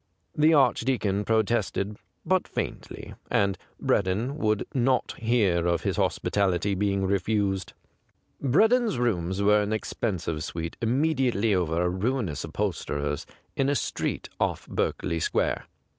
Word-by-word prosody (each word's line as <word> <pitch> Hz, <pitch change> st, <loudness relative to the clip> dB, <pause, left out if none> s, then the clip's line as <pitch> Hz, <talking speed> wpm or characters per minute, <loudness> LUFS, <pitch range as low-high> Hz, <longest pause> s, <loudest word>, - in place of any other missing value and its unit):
The 155 Hz, +2 st, +5 dB
Archdeacon 120 Hz, -6 st, +2 dB
pro 110 Hz, 0 st, +3 dB
tested, 105 Hz, -2 st, -1 dB, 0.3 s
but -, -, +2 dB
faintly, -, -, -5 dB, 0.2 s
and 100 Hz, -1 st, +2 dB, 0.2 s
Breddon 105 Hz, +8 st, 0 dB
would 110 Hz, -5 st, +1 dB
not 130 Hz, 0 st, +1 dB
hear 105 Hz, -8 st, +2 dB
of 85 Hz, -1 st, +1 dB
his -, -, -1 dB
hospitality 100 Hz, 0 st, +1 dB
being 100 Hz, 0 st, 0 dB
refused. 100 Hz, -1 st, 0 dB, 0.7 s
Breddon's 220 Hz, -, +3 dB
rooms 95 Hz, -5 st, 0 dB
were 105 Hz, +1 st, +5 dB
an 105 Hz, -, -2 dB
expen 110 Hz, -2 st, -2 dB
sive 80 Hz, -1 st, -3 dB
suite 85 Hz, -1 st, -5 dB
immediately 125 Hz, -4 st, +2 dB
over 85 Hz, -2 st, +1 dB
a -, -, +2 dB
ruinous 95 Hz, -, -1 dB
upholsterer's 75 Hz, 0 st, -2 dB, 0.3 s
in 135 Hz, 0 st, +1 dB
a 145 Hz, -, +2 dB
street -, -, -2 dB
off -, -, -1 dB
Berkeley 85 Hz, -, -1 dB
Square. -, -, 0 dB
105 Hz, 130 wpm, -27 LUFS, 95-120 Hz, 0.7 s, The